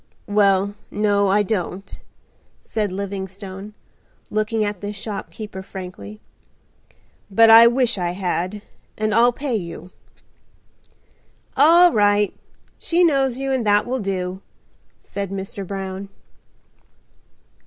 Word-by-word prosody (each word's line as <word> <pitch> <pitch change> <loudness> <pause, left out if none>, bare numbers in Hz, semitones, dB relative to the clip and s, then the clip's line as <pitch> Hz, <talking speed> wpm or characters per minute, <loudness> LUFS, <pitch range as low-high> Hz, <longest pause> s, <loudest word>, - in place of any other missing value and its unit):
"Well, 200 -1 +2 0.2
no, 205 -1 +1
I 205 +2 +3
don't," 195 -2 -4 0.6
said 210 -3 -3
Livingstone, 195 +1 -6 0.6
looking 215 +1 0
at 205 -3 -4
the 205 0 -4
shopkeeper 210 -1 -7
frankly; 180 - -9 1.1
"but 225 +3 +6
I 230 +1 +10
wish 240 -3 +1
I 175 -1 -1
had, 185 +2 -3 0.3
and 215 0 0
I'll 235 +2 +5
pay 265 0 -3
you." 180 -2 -6 1.6
"All 340 +5 +6
right. 205 -1 +3 0.5
She 350 +1 +1
knows 270 -6 +2
you 270 0 -2
and 260 -3 0
that 205 0 +3
will 255 +2 -2
do," 190 -2 -3 0.6
said 200 -1 -6
Mr. 195 0 -6
Brown. 195 0 -5
205 Hz, 110 wpm, -21 LUFS, 190-225 Hz, 1.6 s, I